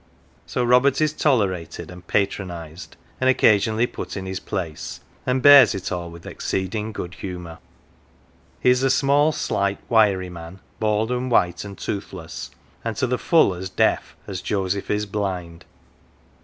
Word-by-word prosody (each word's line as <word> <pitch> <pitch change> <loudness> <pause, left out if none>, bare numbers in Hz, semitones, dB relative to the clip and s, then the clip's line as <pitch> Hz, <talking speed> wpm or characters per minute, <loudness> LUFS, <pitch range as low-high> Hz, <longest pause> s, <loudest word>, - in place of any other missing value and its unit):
So 125 - -1
Robert 125 +3 +4
is 155 -1 +2
tolerated, 100 - 0
and 90 -1 -13
patronised, 90 -5 -3 0.2
and 130 - +3
occasionally 110 -2 +4
put 120 - -6
in 95 - -5
his 95 -1 -4
place; 85 -7 -5 0.3
and 130 0 +1
bears 145 -5 +9
it 95 -1 -4
all 85 -1 -3
with 85 0 -12
exceeding 105 +3 -3
good 90 -4 -6
humour. 90 -3 -7 1.0
He 125 - +4
is 125 0 +2
a 135 - +3
small, 145 +3 +3
slight, 100 -8 -1
wiry 100 -5 +3
man, 85 +2 -10 0.2
bald 110 +1 +1
and 125 +1 -1
white 90 -7 +2
and 100 -1 -9
toothless, 95 -5 -6 0.3
and 115 -1 -3
to - - +1
the 125 0 -1
full 160 - +4
as 90 +1 -6
deaf - - +1
as 95 -2 -5
Joseph 100 -1 -2
is 105 0 0
blind. 90 -5 -4
100 Hz, 155 wpm, -23 LUFS, 90-125 Hz, 1.0 s, bears